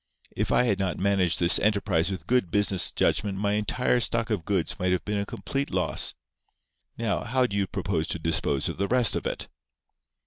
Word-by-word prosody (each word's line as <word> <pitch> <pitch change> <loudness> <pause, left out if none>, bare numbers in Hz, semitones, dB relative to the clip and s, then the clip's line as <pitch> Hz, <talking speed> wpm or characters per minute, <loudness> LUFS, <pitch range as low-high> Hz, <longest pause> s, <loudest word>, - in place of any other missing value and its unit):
If - - -2
I - - +4
had 100 -5 0
not 95 -2 -1
managed 95 -3 +1
this 85 0 +5
enterprise 100 -5 +1
with 95 -2 -6
good 125 -8 +1
business 100 -1 +2
judgment 100 -2 0
my 100 +1 0
entire 105 +4 +1
stock 115 -1 0
of 100 -7 -2
goods 95 -5 -1
might 90 0 0
have 90 - -1
been 105 0 -1
a 100 - -3
complete 140 +1 -4
loss. - - +1 0.8
Now, 115 -3 -1
how 130 +2 +1
do 100 - -4
you 100 -1 0
propose 90 -4 -2
to - - -2
dispose 80 -4 -1
of - - -5
the 100 - 0
rest 125 -1 +3
of - - -2
it?" - - -4
100 Hz, 200 wpm, -26 LUFS, 90-110 Hz, 0.8 s, this